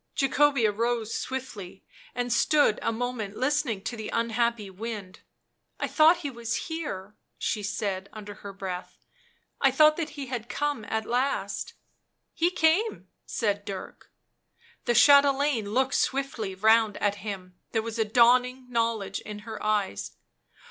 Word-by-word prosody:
Jacobea 275 -4 +3
rose 230 +1 -1
swiftly 205 -8 -5 0.3
and 245 0 0
stood 290 -2 +3
a - - 0
moment 225 -3 -4
listening 260 -6 0
to 240 - -3
the 220 -2 -6
unhappy 230 -1 0
wind. 200 -1 -7 0.3
" - - -48
I - - -1
thought 320 +3 +5
he 280 - -2
was 235 -2 -3
here," 210 - -5 0.2
she 210 - -1
said 195 -1 -3
under 210 -1 -8
her 200 0 -9
breath. 190 -2 -7 0.3
" - - -40
I 275 - +6
thought 305 +3 +5
that 325 -2 -2
he 280 - -4
had 240 -3 -5
come 290 -6 -2
at 220 0 -2
last." 255 +4 -1 0.3
" - - -51
He 340 +1 +2
came," 360 +6 +1 0.2
said 205 -3 -1
Dirk. 195 -2 -8 0.8
The 240 - +2
chatelaine 280 -3 +5
looked 260 +3 +1
swiftly 255 -8 -1
round 220 +1 +4
at 205 0 0
him; 190 -4 -6 0.2
there 225 -1 0
was 230 0 -5
a - - +4
dawning 250 +3 +3
knowledge 230 -4 0
in 210 -1 -8
her 220 -2 -7
eyes. 210 - -1
230 Hz, 150 wpm, -27 LUFS, 210-265 Hz, 0.8 s, I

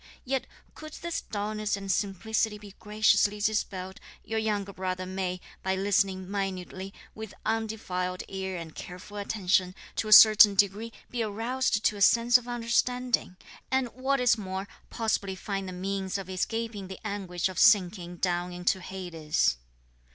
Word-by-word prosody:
Yet 265 0 -1 0.3
could 310 -1 -10
this 340 -1 -4
dulness 210 0 -2
and 195 -1 -3
simplicity 210 +2 0
be 205 -2 -12
graciously 210 -1 +2
dispelled, 195 -3 -2 0.2
your 225 0 -2
younger 205 -2 -2
brother 185 0 -3
may, 185 -1 -3 0.2
by 190 0 0
listening 195 -1 +1
minutely, 190 -1 -4 0.2
with 220 -2 -8
undefiled 190 -5 -2
ear 190 -1 -4
and 165 -2 -8
careful 185 +3 -9
attention, 190 -3 +1 0.2
to 220 - -1
a - - -4
certain 210 -1 +9
degree 205 +3 +1 0.2
be 245 - -2
aroused 225 +1 -1
to 210 - +2
a - - -7
sense 235 +4 +5
of 245 - -14
understanding; 240 -3 0 0.3
and 260 -2 +1
what 265 +3 -1
is 240 -2 +3
more, 190 0 -4 0.2
possibly 205 -4 -1
find 195 0 -4
the - - -6
means 190 +1 -3
of 190 -1 -7
escaping 215 +1 -3
the 190 - -8
anguish 190 -4 -2
of 185 - -5
sinking 185 -5 +4
down 175 0 -1
into 180 +1 0
Hades." 165 - -1
200 Hz, 150 wpm, -28 LUFS, 185-220 Hz, 0.3 s, certain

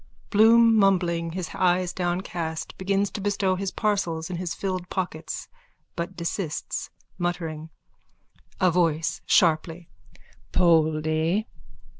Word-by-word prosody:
(Bloom, 225 +2 +6
mumbling, 175 -4 +2
his 185 -1 -4
eyes 180 -1 +1
downcast, 175 -3 -3
begins 195 +1 0
to 205 - -5
bestow 195 -1 +1
his 195 +1 -2
parcels 185 -6 -1
in 175 - -3
his 175 -1 -3
filled 185 -2 -3
pockets 170 -4 -4 0.5
but 170 +2 -4
desists, 170 -1 -3 0.3
muttering.) 165 -3 -3 0.9
A 185 -2 +4
VOICE: 165 -2 +1
(Sharply.) 165 -1 +2 0.6
Poldy! 160 +2 +2
175 Hz, 105 wpm, -25 LUFS, 165-190 Hz, 0.9 s, Bloom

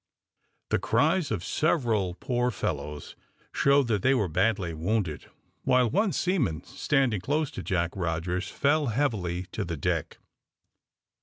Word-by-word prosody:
The - - +3
cries 155 +9 +2
of 100 -6 -2
several 115 - +1
poor 125 0 0
fellows 75 -8 -4 0.4
showed 140 -1 +4
that 105 -4 +1
they 130 +5 +4
were 105 -6 +1
badly 95 0 0
wounded, 85 - -2 0.4
while 125 -3 +3
one 200 +4 +2
seaman, 140 - 0
standing 130 -9 0
close 150 - 0
to - - -6
Jack 85 -4 -1
Rogers, 90 +1 -2
fell 145 +1 +1
heavily 105 -8 -1
to - - -3
the 85 -2 -4
deck. - - -2
110 Hz, 135 wpm, -27 LUFS, 90-140 Hz, 0.4 s, showed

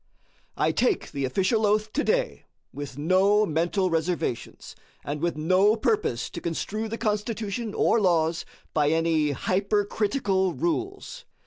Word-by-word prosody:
I - - +2
take 400 - 0
the 140 -2 -2
official 190 - +1
oath 215 +1 +1
today 480 - 0 0.3
with 145 -2 -7
no 190 +7 +3
mental 175 +3 0
reservations, 165 -7 -3 0.3
and 145 +1 -4
with 170 -2 -1
no 185 +7 +3
purpose 420 - -1
to - - -7
construe 215 +6 -3
the 230 - -4
Constitution 215 +1 -2
or 230 - +3
laws 165 -3 +2 0.3
by 150 -2 +2
any 160 -1 +2
hypercritical 200 - 0
rules. 385 +8 -3
195 Hz, 125 wpm, -26 LUFS, 165-220 Hz, 0.3 s, no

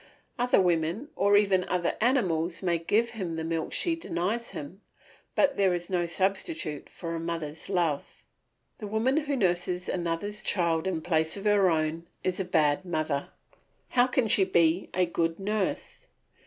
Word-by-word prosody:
Other 245 -2 +4
women, 175 - +1
or 205 -3 +4
even 195 -3 +3
other 180 -2 -1
animals, 185 - +1
may 170 -2 +1
give 220 +8 +1
him 190 -7 -4
the 160 - -3
milk 165 0 -2
she 335 -2 +1
denies 235 - -2
him, 170 +8 -8 0.5
but 280 -1 +3
there 190 -3 +3
is 175 +1 -6
no 175 -2 +1
substitute 190 - -2
for 170 -1 -6
a 165 - -3
mother's 165 -1 -5
love. 170 -7 -1 0.6
The 210 - -5
woman 220 +6 +1
who 290 -2 0
nurses 180 -4 0
another's 180 +4 -2
child 170 -2 0
in 165 -4 -2
place 160 0 +1
of 200 - -8
her 205 -3 +4
own 160 +1 -1 0.2
is 185 0 -1
a 190 - -1
bad 155 -2 +2
mother; 155 -5 -2 0.6
how 245 0 +4
can 250 -2 +1
she 205 - +5
be 170 -1 +2
a 180 0 +3
good 165 0 -1
nurse? 210 - -3
180 Hz, 165 wpm, -28 LUFS, 165-205 Hz, 0.6 s, she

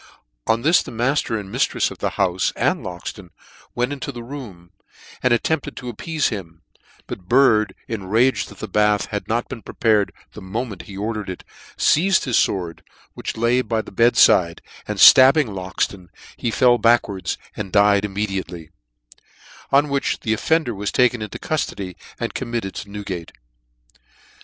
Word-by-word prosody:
On 115 +1 +1
this, 165 +4 +5
the - - -9
matter 120 0 0
and 100 -2 -8
miftrefs - - +1
of - - -11
the - - -2
houfe 95 -2 +1
and - - 0
Loxton 90 +1 -7 0.5
went 125 +3 0
into 140 0 -5
the 120 -3 -8
room, 115 -10 -10 0.5
and 125 - +2
at 120 - +2
tempted 160 -3 -2
to 125 -1 -6
appeafe 155 +6 -1
him: 85 -6 -8 0.4
but 90 - -8
Bird, 120 -5 +4
enraged 115 +4 +1
that - - -14
the - - -6
bath 105 -1 +2
had 105 -1 -4
not 120 +2 -1
been 125 -4 -8
prepared 105 -5 +1 0.2
the 105 - -10
moment 105 +1 -5
he 95 - -8
ordered 105 -1 -3
it, 95 - -7 0.3
feized 185 +4 +3
his 125 -4 +1
fword, 85 -4 0 0.3
which - - -6
lay 120 +2 +2
by 115 -2 -2
the - - -12
bed 115 +5 +3
fide, 85 -2 +4 0.2
and - - -3
ftabbing 135 0 +7
Loxton, 95 0 -3 0.3
he 120 - -2
fell 120 +1 +4
back 120 +1 +4
wards, 95 -5 -4 0.2
and 100 -3 -5
died 100 0 +4
immediately 95 -4 -3
j 80 - -23 1.0
on 140 +2 +4
which 140 -1 -1
the 110 - 0
of 110 - -2
fender 160 -7 +1
was 105 0 -3
taken 125 -2 +2
into 105 - -6
cuftody^ 100 - -3 0.2
and - - -3
committed 115 -6 -4
to 105 - -7
Newgate. 95 -5 -6
110 Hz, 170 wpm, -21 LUFS, 95-125 Hz, 1.0 s, ftabbing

